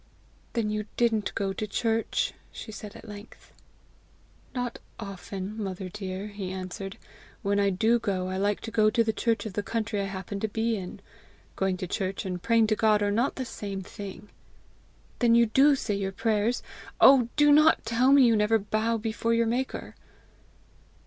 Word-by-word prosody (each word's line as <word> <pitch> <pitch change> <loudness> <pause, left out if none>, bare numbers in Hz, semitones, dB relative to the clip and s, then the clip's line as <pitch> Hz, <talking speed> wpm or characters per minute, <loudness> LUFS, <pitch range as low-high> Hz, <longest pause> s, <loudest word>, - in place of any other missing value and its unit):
"Then 225 -3 0
you 210 0 -3
didn't 225 -4 +1
go 195 -1 -1
to 215 +2 -4
church!" 225 +2 0 0.2
she 220 - -8
said 210 -1 -9
at - - -12
length. 205 +1 -12 1.0
"Not 245 -1 -3 0.2
often, 200 0 -6
mother 190 -1 -5
dear," 195 +1 -5
he 200 -2 -6
answered. 190 +1 -6 0.5
"When 200 0 +1
I 200 0 +3
do 220 +5 +2
go, 190 -4 -2
I 185 0 -3
like 205 +1 0
to 225 - -6
go 215 0 +4
to 230 +2 +2
the 220 -1 0
church 230 +1 0
of 215 - -5
the 205 - -1
country 215 -1 -2
I - - -1
happen 195 +1 -5
to 220 - -1
be 225 +2 0
in. 185 -3 -7 0.5
Going 190 -1 0
to 185 - -4
church 190 +2 -3
and 180 -2 -4
praying 230 +2 +3
to - - +1
God 215 -1 +3
are 205 - +1
not 235 +7 +1
the 260 - -4
same 200 -4 -5
thing." 200 +2 -9 0.9
"Then 235 -2 +4
you 235 0 +6
do 275 +6 +5
say 225 -5 -2
your 195 -1 -2
prayers? 225 +2 0 0.4
Oh, 260 -3 +7
do 295 -1 +5
not 305 -2 +5
tell 235 +4 +3
me 280 -1 +7
you 230 -2 +4
never 210 +1 +3
bow 215 +2 -1
down 225 - -2
before 230 +1 0
your 230 0 +2
maker!" 245 +3 -2
215 Hz, 185 wpm, -27 LUFS, 195-230 Hz, 1.0 s, Oh